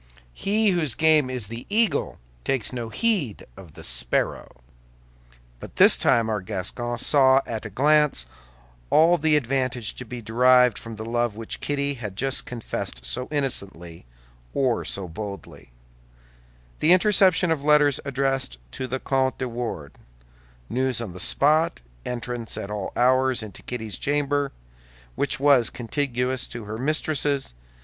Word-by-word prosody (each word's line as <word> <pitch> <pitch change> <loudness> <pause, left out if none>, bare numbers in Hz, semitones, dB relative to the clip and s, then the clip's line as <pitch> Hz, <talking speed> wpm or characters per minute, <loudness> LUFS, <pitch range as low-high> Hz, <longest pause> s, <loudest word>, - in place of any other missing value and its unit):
He 210 - +1
whose 155 -9 0
game 155 -4 +3
is 125 -4 -3
the 115 +3 -8
eagle 220 +1 +1 0.3
takes 130 - -1
no 120 -2 -4
heed 180 - -1
of 85 -6 -14
the - - -11
sparrow. - - -3 1.0
But - - -11
this - - +7
time 115 -2 +2
our 105 -2 -1
Gascon 110 +5 -4
saw 135 +1 +4
at 110 -2 -5
a - - -10
glance 150 - +3 0.6
all 170 +2 +5
the 155 0 +3
advantage 130 -4 -1
to - - -5
be 125 0 -7
derived 125 +1 +4
from 115 -1 -8
the 110 +1 -7
love 120 -1 -1
which 115 -1 -5
Kitty 140 0 -1
had 105 -4 -5
just 135 +5 -1
confessed 105 - -5
so 95 - -3
innocently, 95 - -3 0.5
or 130 -4 +1
so 95 -2 -2
boldly: 100 - -8 1.1
the 165 - +5
interception 185 -2 +4
of 150 -3 -1
letters 150 -2 +4
addressed 135 - -2
to 130 - -5
the 130 +1 -3
Comte 130 -1 0
de 130 - -3
Wardes, 115 - -6 0.7
news 130 - 0
on 110 -7 -3
the 90 - -9
spot, 155 - +2 0.3
entrance 120 -1 -4
at 100 - -5
all 105 -2 -4
hours 130 0 +2
into 105 -3 -9
Kitty's 110 -4 -5
chamber, 145 -1 0 0.6
which 140 - -1
was 140 -4 +4
contiguous 125 0 -2
to 120 - -8
her 110 +2 -6
mistress's. 145 - 0
125 Hz, 145 wpm, -24 LUFS, 110-145 Hz, 1.1 s, this